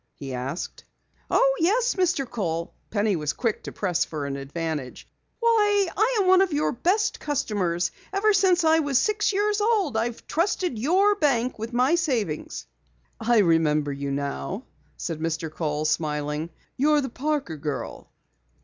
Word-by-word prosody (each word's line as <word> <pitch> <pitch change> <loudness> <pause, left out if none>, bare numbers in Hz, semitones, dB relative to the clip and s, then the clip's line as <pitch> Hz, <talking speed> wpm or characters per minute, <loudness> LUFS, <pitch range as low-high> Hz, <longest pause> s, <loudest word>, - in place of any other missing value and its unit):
he 135 -2 -7
asked. 130 +7 -5 0.5
"Oh, - - +3
yes, 450 +9 +2
Mr. 360 -8 +1
Kohl." 170 -8 -3 0.2
Penny 205 -1 +1
was 150 -3 -1
quick 230 -4 -1
to - - -5
press 180 -4 0
for 150 -3 -5
an 140 -1 -3
advantage. 145 -1 -5 0.3
"Why, 415 -5 +3
I 450 +4 +2
am 385 - +2
one 375 0 +6
of 385 -2 +2
your 295 0 +1
best 370 - 0
customers. 195 - -1 0.2
Ever 410 +2 +3
since 370 -3 +3
I 320 0 +5
was 285 -4 +1
six 415 +9 +2
years 415 +1 +1
old 415 - +1
I've 230 +1 -2
trusted 345 - -1
your 375 - +3
bank 265 - 0
with 225 +2 -5
my 250 +5 +2
savings!" 245 - -1 0.5
"I 240 0 +2
remember 155 -4 +2
you 140 0 -4
now," 140 - -3 0.3
said 165 -3 -4
Mr. 160 0 -2
Kohl, 150 -2 -2
smiling. 150 0 -1 0.3
"You're 300 +2 +3
the 265 - -3
Parker 275 - -2
girl." 145 0 -5
240 Hz, 155 wpm, -25 LUFS, -, 0.5 s, one